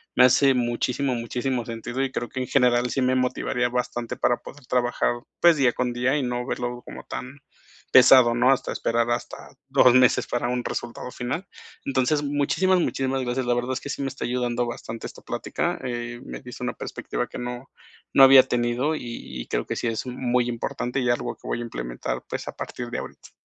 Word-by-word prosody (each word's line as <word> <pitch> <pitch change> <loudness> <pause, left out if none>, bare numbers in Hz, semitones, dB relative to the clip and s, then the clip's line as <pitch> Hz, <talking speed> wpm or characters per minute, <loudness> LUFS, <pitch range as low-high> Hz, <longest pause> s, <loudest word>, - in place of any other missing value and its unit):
me 125 - +7
hace 135 +2 +5
muchísimo, 125 +2 0
muchísimo 120 +1 -2
sentido, 120 +3 -3
y 135 - -2
creo 120 - -3
que 130 - -5
en 130 - -1
general 125 -2 +3
sí 135 - 0
me 130 0 +2
motivaría 125 -1 0
bastante 120 -1 -3
para 120 - +2
poder 145 - -13
trabajar, 125 -1 +1 0.3
pues, 170 -2 +6
día 130 -4 +3
con 125 -1 -1
día 125 +3 +1
y 150 - +1
no 125 -1 -2
verlo 120 0 -4
como - - -9
tan 130 +3 -7 0.5
pesado, 125 -2 +7
¿no? 125 +2 +4
Hasta 135 - 0
esperar 115 0 0
hasta 120 0 -2 0.3
2 130 -2 +6
meses 130 -1 +4
para 120 0 -1
un 125 0 -1
resultado 120 +1 -5
final. 140 +10 -4 0.4
Entonces, 135 +2 +1
muchísimas, 145 +6 +2
muchísimas 135 -5 -1
gracias. 125 0 -2
La 120 - +3
verdad 120 +1 -1
es 130 - -4
que - - -7
sí 140 - -3
me - - -1
está 135 - -7
ayudando 120 -1 -1
bastante 115 -1 -6
esta - - -13
plática. - - -2
Eh, 120 -1 -4
me - - -7
dice 125 -1 -10
una 125 0 -1
perspectiva - - -4
que - - -8
no 125 +2 -6 0.4
no 135 - +8
había 135 -1 +9
tenido 125 +4 0
y 115 - -6
y - - -9
creo - - -1
que - - -3
sí 120 - -2
es 115 +2 -2
muy 125 -1 0
importante 120 +2 -3
y 125 - 0
algo 120 - -1
que - - -13
voy - - -1
a - - -4
implementar, - - -4
pues - - -4
a - - -6
partir 120 -1 -6
de - - -2
ahorita. - - -10
125 Hz, 205 wpm, -25 LUFS, 120-130 Hz, 0.5 s, había